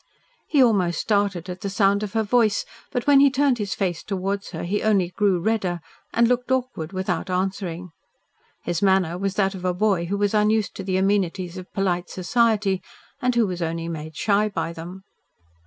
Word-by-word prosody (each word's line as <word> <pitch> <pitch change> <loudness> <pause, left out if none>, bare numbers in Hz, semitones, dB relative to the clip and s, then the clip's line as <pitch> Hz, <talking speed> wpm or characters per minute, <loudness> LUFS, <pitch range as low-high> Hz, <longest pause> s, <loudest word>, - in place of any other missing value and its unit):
He 285 -4 +4
almost 190 -8 +2
started 200 -4 0
at 180 0 -7
the 200 - -3
sound 200 0 +2
of 210 -2 -4
her 225 -1 +1
voice, 220 -1 +2 0.3
but 245 -3 -2
when 285 -1 +6
he 280 0 +7
turned 270 -2 +2
his 205 -2 -2
face 180 -4 -1
towards 195 0 -3
her - - -6
he 200 +4 -1
only 200 -5 +2
grew 190 0 +1
redder, 185 -3 0 0.3
and 235 0 +3
looked 250 +1 0
awkward 250 -11 -1
without 185 -1 -2
answering. 185 -2 -2 0.7
His 175 -1 -2
manner 190 -4 +3
was 195 +1 -2
that 195 -1 +1
of 185 -2 -8
a 180 -1 0
boy 195 -3 +1
who 200 +4 -2
was 205 0 +1
unused 215 0 +2
to 195 - -5
the 185 -1 0
amenities 190 -2 0
of 185 -1 -9
polite 180 -3 -1
society, 205 0 +1 0.4
and 250 -1 +1
who 235 -2 +4
was 180 -3 -4
only 165 0 -2
made 160 -1 -6
shy 210 +5 +2
by 170 -4 -3
them. 175 +4 -9
195 Hz, 190 wpm, -23 LUFS, 180-215 Hz, 0.7 s, he